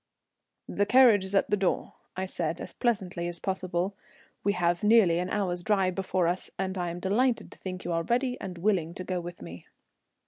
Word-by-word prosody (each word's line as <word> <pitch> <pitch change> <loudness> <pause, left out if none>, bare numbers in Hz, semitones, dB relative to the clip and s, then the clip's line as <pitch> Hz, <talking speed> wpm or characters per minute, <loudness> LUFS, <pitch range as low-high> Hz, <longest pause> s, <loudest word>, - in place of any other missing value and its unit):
"The 205 - 0
carriage 240 -6 +6
is 190 +1 -1
at 195 - +2
the - - +5
door," 190 -2 -1 0.2
I 190 - -1
said 170 -3 -2
as - - -7
pleasantly 190 -7 -1
as 175 -1 -5
possible. 185 0 -2 0.5
"We 200 - +2
have 175 -1 +1
nearly 210 -6 +5
an 180 +1 -2
hour's 180 -4 -1
drive 190 -1 +1
before 185 -2 0
us, 175 +2 -2
and 190 0 -2
I 175 -2 -2
am 170 +1 -5
delighted 230 +6 +1
to - - -15
think 185 -1 -6
that - - -14
you 175 - -2
are 165 - +1
ready 245 +7 0
and 185 -2 -6
willing 175 -3 0
to 185 - -5
go 180 0 -2
with 175 0 -8
me." 85 +2 -10
185 Hz, 210 wpm, -28 LUFS, 175-205 Hz, 0.5 s, carriage